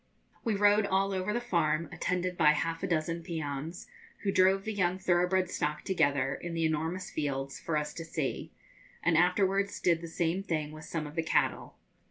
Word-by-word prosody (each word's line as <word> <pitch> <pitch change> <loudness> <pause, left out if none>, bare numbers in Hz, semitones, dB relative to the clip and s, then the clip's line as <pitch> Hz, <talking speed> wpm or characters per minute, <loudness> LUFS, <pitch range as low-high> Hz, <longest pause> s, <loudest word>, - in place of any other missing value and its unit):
We 225 -4 +1
rode 205 +1 +4
all 195 +1 +1
over 190 +2 -1
the 235 - 0
farm, 170 -8 0
attended 180 +2 -1
by 150 -3 +5
half 165 +2 -2
a 195 - -1
dozen 165 0 -1
peones, 160 -1 -5 0.4
who 200 - +1
drove 190 +1 +4
the 220 - -3
young 185 -2 +1
thoroughbred 185 0 +2
stock 150 0 -2
together, 140 -7 +1
in 170 +3 -5
the 165 -1 +1
enormous 160 +4 -2
fields, 140 -2 -3
for 160 -2 -1
us 150 0 -2
to 165 - -6
see, 160 -4 -3 0.5
and 165 0 +3
afterwards 195 +3 +2
did 170 -2 +2
the 170 - -6
same 170 +2 -1
thing 155 -6 -2
with 155 0 -10
some 160 -2 -3
of 150 - -8
the 165 - 0
cattle. 160 - 0
170 Hz, 190 wpm, -30 LUFS, 155-190 Hz, 0.5 s, by